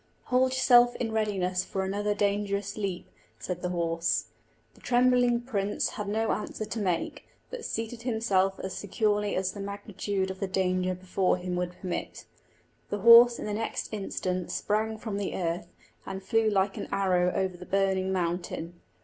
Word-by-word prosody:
"Hold 255 +1 +5
yourself 245 -2 +5
in 225 -2 -2
readiness 190 -4 0
for 190 - -3
another 205 +2 -1
dangerous 200 0 0
leap," 195 -4 -3 0.3
said 180 -1 -5
the 180 - -2
horse. 170 -1 0 0.4
The - - -21
trembling 245 -1 +3
prince 205 -5 -1
had 210 - -5
no 220 +2 0
answer 215 +1 -3
to 225 - -4
make, 180 -5 -2 0.2
but - - -6
seated 225 +1 -4
himself 210 -5 +1
as 190 - -4
securely 210 0 0
as 185 0 0
the 205 - -9
magnitude 200 -1 -3
of 190 - -9
the 195 - -1
danger 185 -1 0
before 185 0 0
him 180 0 -4
would 180 0 -3
permit. 180 -2 -5 0.6
The 205 - -3
horse 235 +2 +9
in - - -5
the 210 - -2
next 225 +1 -3
instant 185 -3 -3
sprang 220 +1 -1
from 215 -2 -4
the 200 -1 -3
earth, 170 -1 -2 0.4
and 190 0 -6
flew 225 +3 +2
like 195 -1 +1
an - - -4
arrow 180 -2 +2
over 190 -1 0
the 180 +1 -11
burning 190 -1 +1
mountain. 175 -1 -3
200 Hz, 165 wpm, -28 LUFS, 185-220 Hz, 0.6 s, horse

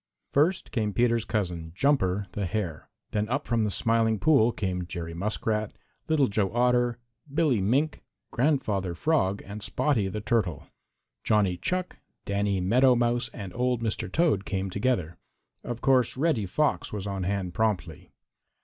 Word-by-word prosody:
First 165 +6 +2
came 110 -5 -1
Peter's 115 -1 +2
cousin, 85 -7 -3
Jumper 105 -6 +2
the 100 -2 -2
Hare. 90 -6 -4 0.2
Then 105 0 -1
up 135 +4 -1
from 115 -2 +1
the - - 0
Smiling 115 +1 +2
Pool 130 -2 +4
came 90 -5 -3
Jerry 85 -2 -5
Muskrat, 105 +3 -2 0.3
Little 155 -3 +3
Joe 100 -2 0
Otter, 120 -1 +2 0.3
Billy 145 -8 +2
Mink, 135 +10 +1 0.3
Grandfather 105 - 0
Frog 100 - +1
and 100 +2 -7
Spotty 115 -3 0
the 105 +3 -4
Turtle. 105 -7 -1 0.6
Johnny 100 -4 +2
Chuck, 180 - -3 0.3
Danny 100 -1 0
Meadow 125 +8 +4
Mouse, 120 0 +1
and 95 -6 -8
old 125 0 0
Mr. 110 -4 -2
Toad 155 - +2
came 95 -1 -3
together. 100 -6 -1 0.4
Of 120 -1 -5
course 130 -2 +3
Reddy 135 - +1
Fox 150 +10 0
was 105 -2 -4
on 100 -1 -3
hand 95 -1 -2
promptly. 90 -6 -1
110 Hz, 150 wpm, -27 LUFS, 95-125 Hz, 0.6 s, Pool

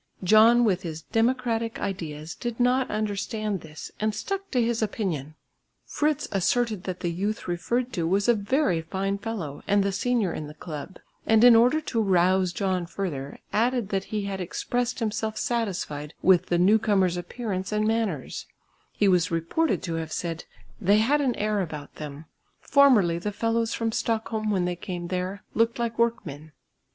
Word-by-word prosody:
John 220 +5 +6
with 190 -4 +1
his 160 -3 -6
democratic 230 -1 0
ideas 160 -4 -4
did 240 -1 -5
not 250 +1 +2
understand 215 -1 -2
this 155 -1 -9
and 215 0 0
stuck 390 - -4
to 255 - 0
his 230 -1 +1
opinion. 175 - -2 0.5
Fritz 300 0 0
asserted 215 +1 0
that 185 -1 -4
the 175 - -1
youth 205 +6 -3
referred 235 +8 -1
to 165 -2 -1
was 195 +4 +1
a 240 - +6
very 220 - +1
fine 195 +4 -2
fellow 200 -10 -5
and 200 0 +3
the 200 - 0
senior 220 -2 0
in 150 - -5
the 150 - -11
club, 155 +2 -7 0.3
and 220 0 +5
in 245 -1 +9
order 250 +7 +5
to 240 -7 -1
rouse 185 -2 +3
John 185 -2 -1
further, 150 -8 -4 0.2
added 235 -1 +1
that 195 -1 -1
he 210 -1 -3
had 195 -1 -4
expressed 245 +7 -2
himself 220 -1 -2
satisfied 180 -10 -2
with 185 -1 +5
the 175 - +1
newcomers' 195 -1 +3
appearance 190 +1 -4
and 210 0 +1
manners; 220 - -2 0.5
he 205 - +2
was 180 -3 +3
reported 165 - 0
to 170 - -3
have 160 -1 -7
said 165 -1 -4 0.4
"they 200 +2 +4
had 275 +7 +3
an 260 -4 +1
air 210 -1 0
about 150 -5 -7
them; 150 0 -7 0.3
formerly 225 -12 +4
the 210 +4 -3
fellows 230 +2 0
from 225 -1 -1
Stockholm 220 -1 -1
when 190 -4 +1
they 180 0 -1
came 175 -1 -6
there, 185 +2 -3
looked 230 +1 +2
like 235 -1 -3
workmen." 155 -10 -1
205 Hz, 170 wpm, -26 LUFS, 175-230 Hz, 0.5 s, in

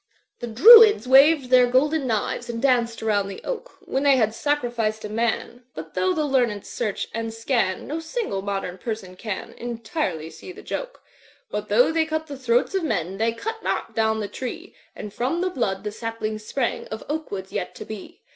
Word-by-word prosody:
"The 240 - -5
Druids 425 - +8
waved 270 0 +6
their 250 -1 +6
golden 275 +3 +2
knives 220 0 -2
And 230 -1 -3
danced 235 -3 +1
around 205 -3 +1
the 195 - -7
Oak, - - -6
When 265 - -2
they 280 -1 +5
had 220 -3 +2
sacrificed 240 -6 -1
a - - -5
man; 235 +2 -2
But 160 0 -8
though 370 - +1
the 320 -4 0
lezmM 245 -7 +1
search 205 - -3
and 225 0 -3
scat^ 225 -4 -1
No 310 +3 -4
single 325 - -3
modem 195 -2 -4
person 215 -5 -5
can 205 0 -6
Entirely 230 - -3
see - - -10
the - - -12
joke; - - -6 0.5
But - - -4
though - - +4
they 320 -1 +1
cut 315 0 -2
the 290 -3 -7
throats 245 +5 +1
of 385 -2 0
men 190 - -2
They 225 +1 +2
cut 445 - -5
not - - -2
down 220 0 +1
the 205 - -3
tree, 325 - -7 0.2
Aad 205 - -7
from 260 +10 -1
the 370 0 0
blood 195 - -2
the 210 - -3
saplings 215 -1 -4
sprang 240 +2 -2
Of 220 - -7
oak 310 +2 -3
woods 190 -1 -6
yet - - -4
to - - -8
be. 220 - -9
235 Hz, 195 wpm, -24 LUFS, 215-300 Hz, 0.5 s, Druids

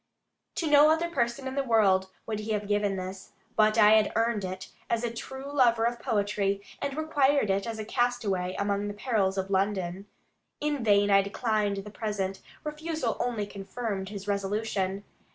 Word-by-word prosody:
To 335 - -1
no 295 0 +7
other 330 +2 +1
person 245 -2 -1
in 260 - -4
the 275 - 0
world 200 -6 +3 0.2
would 215 -2 -3
he 215 +1 -2
have 210 -1 -2
given 205 -1 +1
this, 185 +1 -7 0.2
but 215 +1 +4
I 210 -1 +7
had 215 -1 +5
earned 225 -2 +1
it, 185 0 -5 0.2
as 230 0 0
a 235 -1 -2
true 265 +4 -7
lover 235 -5 +4
of 235 0 -1
poetry, 200 -2 0 0.2
and 280 0 -3
required 285 -7 +2
it 195 +3 0
as 225 -1 -4
a 215 - -5
castaway 210 -7 0
among 200 0 0
the 205 - -5
perils 205 -4 0
of 190 +1 -2
London. 190 -1 -1 0.5
In 295 -4 -1
vain 205 -1 +4
I 195 0 +7
declined 205 0 -1
the 210 - -8
present; 200 -3 -3 0.2
refusal 305 -4 -2
only 230 -4 -1
confirmed 200 0 -5
his 200 -1 -7
resolution. 200 -1 -1
210 Hz, 175 wpm, -28 LUFS, 200-240 Hz, 0.5 s, no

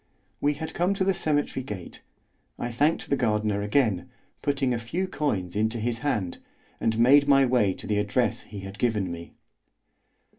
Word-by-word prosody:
We 145 +1 +1
had 160 +2 -6
come 180 +3 +1
to 195 - +1
the 195 +1 +3
cemetery 145 -5 0
gate. 100 -8 -8 0.6
I 120 - -3
thanked 145 +7 +1
the - - +5
gardener 105 -4 0
again, 105 -3 +1 0.3
putting 135 -3 +1
a 120 - -1
few 165 +12 -2
coins 100 - -2
into 110 +2 0
his 115 +1 -1
hand, 105 -12 -1 0.4
and 110 -1 0
made 140 +5 +6
my 135 -1 +6
way 120 -7 +3
to - - -9
the 105 -1 +1
address 105 +2 0
he 100 -1 -9
had 95 +1 -9
given 105 -6 0
me. 85 0 -8
120 Hz, 175 wpm, -26 LUFS, 105-145 Hz, 0.6 s, made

